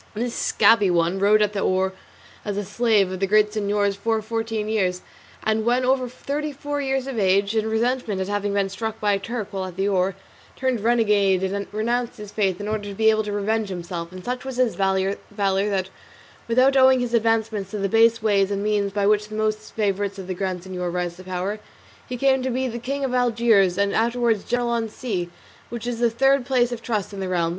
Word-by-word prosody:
This 235 +2 -2
"scabby 210 -4 +4
one" 175 +2 +1
rowed 210 +2 +4
at 210 0 -1
the 200 - -2
oar 190 0 +1 0.5
as 205 -2 -3
a 205 - -2
slave 210 -2 +2
of 185 - -5
the 195 - +1
Grand 210 +1 +3
Signor's 205 -1 0
for 225 +2 0
fourteen 225 -1 -3
years, 185 -4 0 0.4
and 220 0 +1
when 245 +2 +2
over 255 -1 +1
thirty 290 +4 -4
four 290 +1 -4
years 270 -1 -1
of 265 -4 -4
age, 200 +2 +2
in 220 0 +1
resentment 225 -2 0
at 190 - -2
having 205 0 -1
been 200 -1 +1
struck 220 +3 -4
by 205 -1 +2
a 195 - 0
Turk 220 0 -5
while 190 -1 -3
at 185 -2 -8
the 195 +1 +1
oar, 190 -1 +1 0.4
turned 260 -3 0
renegade 205 -4 +2
and 200 +1 -2
renounced 235 +3 -1
his 210 -1 -9
faith 195 -4 0
in 205 - -5
order 215 -1 -2
to 200 - -7
be 220 +2 +4
able 215 0 +1
to 210 - -3
revenge 210 +1 -1
himself; 175 -2 -5
and 185 0 -10
such 250 +1 -3
was 265 -1 -6
his 250 -3 +2
valour 195 0 0 0.2
that, 195 -1 0 0.6
without 255 +4 +4
owing 260 -1 +6
his 245 -1 -2
advancement 225 -3 +1
to 215 - -5
the 200 -1 0
base 225 +2 +3
ways 200 -3 +3
and 200 0 -2
means 205 -1 0
by 200 0 0
which 210 +1 +2
most 215 0 -2
favourites 200 -2 -1
of 190 - -7
the 185 - -3
Grand 185 -1 -3
Signor 180 -1 -4
rise 175 -1 -3
to 185 - -11
power, 185 +3 -3 0.5
he 250 - -3
came 265 +1 +3
to 260 - -1
be 260 +1 -1
king 275 +3 -2
of 255 - -3
Algiers, 230 -7 +3
and 200 0 +1
afterwards 235 -2 +1
general 245 0 0
on 230 -1 -1
sea, 200 -7 -4 0.4
which 235 0 -6
is 240 -1 -3
the 235 -1 +3
third 270 +3 +3
place 245 -1 +1
of 235 -1 -5
trust 215 -4 -3
in 200 - -6
the 190 -1 -3
realm. 170 -2 +1
210 Hz, 220 wpm, -23 LUFS, 195-235 Hz, 0.6 s, owing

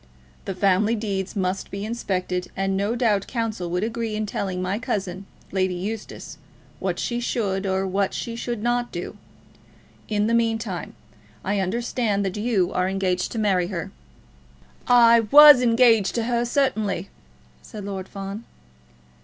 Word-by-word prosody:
The 195 - -4
family 200 +4 +2
deeds 200 -3 -3
must 190 -1 -2
be 200 +1 -5
inspected, 185 -5 -2
and 195 0 0
no 200 +4 0
doubt 215 -5 +1
counsel 220 -7 -3
would 180 +3 -1
agree 225 -1 -3
in 215 0 -1
telling 190 -3 -3
my 185 +3 -2
cousin, 195 -4 -3 0.2
Lady 185 -1 0
Eustace, 205 +4 -6 0.4
what - - -2
she 240 0 -2
should, 200 -5 -1
or 190 0 0
what 195 +1 0
she 230 - -5
should 235 -2 -4
not 240 0 0
do. 175 - -6 0.9
In 210 -1 +1
the 230 - +1
meantime, 225 -6 -1 0.5
I 200 +1 0
understand 210 +1 -1
that 190 - -3
you 210 -4 0
are 185 +1 +1
engaged 185 -2 -1
to - - -5
marry 190 -5 +1
her?" 175 -4 -5 1.0
"I 235 -1 +7
was 295 -1 +10
engaged 230 -4 +4
to 230 - 0
her, 240 0 0
certainly," 220 -8 0 0.5
said 210 -4 -9
Lord 190 -2 -5
Fawn. 195 +2 -6
205 Hz, 150 wpm, -23 LUFS, 190-230 Hz, 1.0 s, was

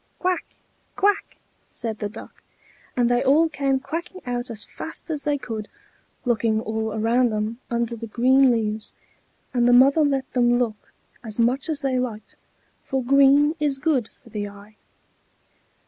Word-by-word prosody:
"Quack! 365 -1 -1 0.5
quack!" 405 0 +1 0.3
said 225 -3 -5
the 205 - -3
Duck, 220 - -12 0.6
and 245 -1 +3
they 245 0 +2
all 305 +5 +4
came 275 -3 0
quacking 335 +7 -6
out 245 0 -3
as 215 -3 -6
fast 325 +1 -7
as 295 -2 -3
they 290 -1 +1
could, 220 -5 -6 0.6
looking 225 -2 +1
all 220 0 -2
around 235 +3 +2
them 215 +2 -2
under 235 0 -1
the 230 0 -7
green 260 +4 +4
leaves; 220 -2 -1 0.6
and 240 -1 +3
the 245 - +5
mother 275 +5 +6
let 275 -3 0
them 240 -1 +3
look 225 -4 -3 0.3
as 220 -3 -2
much 250 +6 +1
as 310 -2 -2
they 265 -3 0
liked, 230 -4 -5 0.5
for 265 -2 -2
green 280 +3 +5
is 290 -2 +1
good 270 -5 0
for - - -16
the 205 -1 -3
eye. 205 +1 -15
245 Hz, 160 wpm, -23 LUFS, 225-275 Hz, 0.6 s, mother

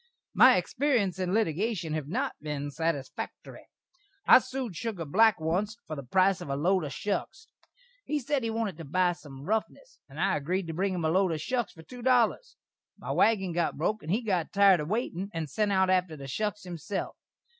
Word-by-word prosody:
My - - +7
xperience 240 - 0
in 185 -1 -1
litigashun 195 -3 0
hav 155 -3 -3
not 260 - -1
been 145 -1 -4
satisfaktory. 160 -3 -4 0.6
I - - +9
sued 255 -5 -5
Sugar 200 -4 -4
Black 220 +8 +4
onst 185 +8 -1
for 155 - -5
the 140 - -5
price 185 +8 +2
of - - -7
a 140 - -1
lode 180 +5 +2
of 140 - -5
shuks. 205 - -3 0.6
He 300 - -1
sed 285 0 -1
he 230 - -2
wanted 220 -6 -2
to - - -6
buy 180 +4 +2
sum 140 -6 -12
ruffness, 220 - -3
and - - -11
I - - +2
agreed 180 +6 -2
to 165 - -5
bring 190 +3 -1
him 170 -3 -2
a - - +2
lode 185 -1 +2
of 155 - -3
shuks 240 - -2
for 160 - -14
two 245 +9 -11
dollers. 250 - +2 0.4
My - - -6
waggin 195 -6 +2
got 170 0 -1
broke 210 +7 -1
and 155 - -5
he 225 +5 +1
got 185 -7 -1
tired 200 -3 +5
a 150 - -3
waitin', 200 -1 -2
and 160 -2 -2
sent 210 +6 0
out 190 -1 +3
atter 180 -4 +1
the 135 -1 -8
shuks 210 +7 -3
himself. 180 +2 -5
185 Hz, 200 wpm, -28 LUFS, 160-220 Hz, 0.6 s, I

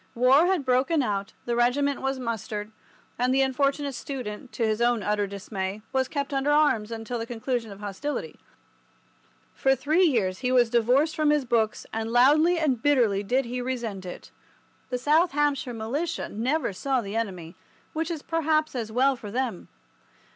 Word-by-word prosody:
War 260 +7 +5
had 365 -7 +1
broken 265 +4 +2
out, 200 -3 -2
the 240 - -1
regiment 270 +4 +1
was 270 0 -1
mustered, 220 -3 -4 0.5
and 250 +1 +2
the 270 +1 +4
unfortunate 275 +1 0
student, 250 -2 -6
to 235 - 0
his 215 +1 0
own 240 -3 +2
utter 205 0 0
dismay, 195 0 -5
was 260 -1 +1
kept 280 -1 -3
under 270 +1 0
arms 295 -8 +3
until 230 +1 -4
the 225 - -4
conclusion 235 -1 -3
of 200 +1 -11
hostilities. 210 - -5 1.1
For 270 0 +2
three 310 +7 +1
years 195 - 0
he 250 -1 -1
was 245 -3 +4
divorced 250 +7 +3
from 305 -1 +2
his 295 -2 +2
books, 230 -3 0
and 225 0 -3
loudly 300 +8 +5
and 275 -8 0
bitterly 235 -9 +3
did 250 +6 0
he 250 +1 -4
resent 235 -6 -4
it. 180 - -9 0.6
The 250 - -1
South 305 +7 +3
Hampshire 290 -3 0
Militia 270 +9 -3
never 250 +3 -1
saw 265 +6 0
the 200 -1 -6
enemy, 185 -7 -3 0.4
which 320 +1 -2
is 325 -4 -4
perhaps 315 -1 0
as 230 -4 -4
well 265 +4 +3
for 215 -4 -9
them. 235 -4 -3
250 Hz, 170 wpm, -26 LUFS, 220-285 Hz, 1.1 s, War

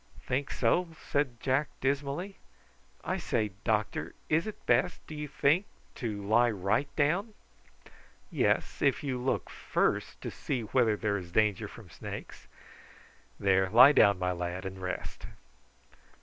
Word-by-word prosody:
"Think 135 +2 -1
so?" 170 +10 +2
said 135 -5 -1
Jack 135 +4 +1
dismally. 140 +8 -2 0.7
"I - - -1
say, 110 -3 -1
doctor, 110 -2 -1
is 160 +6 +2
it 215 - -8
best, 180 -2 +1
do - - -9
you 150 0 -5
think, 145 +6 +2 0.3
to 105 -4 -4
lie 120 +4 +4
right 105 +7 0
down?" 185 +9 +1 1.0
"Yes, - - 0
if 140 +1 +2
you 130 -3 -2
look 130 - -1
first - - -1
to - - -5
see 130 -4 -3
whether 110 -1 +2
there 105 -2 0
is 85 -2 -10
danger 105 -1 +2
from - - -13
snakes. - - -8 0.9
There, 95 -1 +3
lie 125 +7 +9
down, 100 -9 +5
my 90 0 0
lad, 90 +1 -4
and 95 0 -6
rest." 90 0 -5
120 Hz, 140 wpm, -30 LUFS, 100-145 Hz, 1.0 s, lie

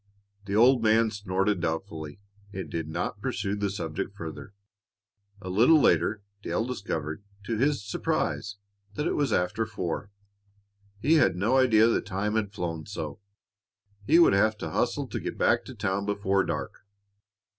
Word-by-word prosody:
The 100 0 -2
old 120 +3 +5
man 110 0 +3
snorted 100 -1 -1
doubtfully 80 0 -4 0.3
and 95 -2 -6
did 80 -2 -3
not 80 +2 -4
pursue 100 0 -2
the 100 -1 -1
subject 90 +1 -4
farther. 85 +4 -8 0.8
A 95 - -9
little 115 - +5
later, 105 -6 +2 0.2
Dale 110 - -1
discovered, 100 -8 -4 0.2
to 115 +2 -2
his 140 0 +1
surprise, 105 0 -1 0.4
that 150 - -2
it - - +1
was 145 -2 +1
after 90 +5 +1
four. 100 -2 -4 0.9
He 155 +10 +3
had 150 - +4
no 110 +8 +2
idea 115 -4 +5
the 115 - +2
time 100 +3 -2
had 110 -3 0
flown 85 -5 -4
so. - - -6 0.9
He 160 - +6
would 170 - +6
have 110 +2 +3
to - - -5
hustle - - 0
to - - -5
get - - -5
back - - +2
to - - -9
town 100 +1 -2
before 100 -1 +1
dark. - - -4
100 Hz, 155 wpm, -27 LUFS, 95-110 Hz, 0.9 s, He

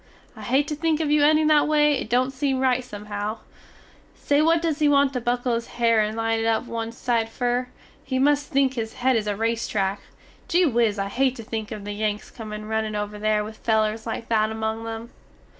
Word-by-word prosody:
I - - -11
hate 270 +4 +1
to 300 - -2
think 315 0 0
of 305 -2 0
you 300 -1 +4
ending 310 +1 +4
that 300 -1 +4
way 300 -1 +4
it 265 -5 -3
dont 255 +3 +1
seem 270 -1 0
rite 255 -1 +2
somehow. 210 -1 -5 0.8
Say 290 +1 +1
what 330 +2 +4
does 320 -2 -1
he 300 -1 +4
want 280 -1 +3
to 250 - -2
buckle 245 +1 0
his 230 0 -2
hare 230 -2 +3
and 215 +1 0
line 225 0 0
it 225 - -1
up 225 +1 +1
one 230 -1 -4
side 230 -1 -1
fer? 245 +2 -1 0.4
He 260 -1 -2
must 290 +2 +2
think 270 -1 +2
his 225 -3 -4
hed 255 +1 +1
is 215 -2 0
a 205 - 0
race 230 +2 -1
track. 195 -1 -1 0.5
Gee 360 +1 +3
whiz 230 -6 +2
I 195 0 -2
hate 260 +4 +1
to 230 - -8
think 220 -1 -5
of 210 -2 -6
the 205 - -4
Yanks 210 0 -3
comin 215 -2 -7
runnin 220 0 -2
over 210 0 -4
there 215 0 +1
with 215 +1 -10
felers 220 0 +1
like 225 0 -4
that 215 -1 +2
among 220 +1 -3
them. 225 +1 -6
230 Hz, 225 wpm, -24 LUFS, 220-270 Hz, 0.8 s, you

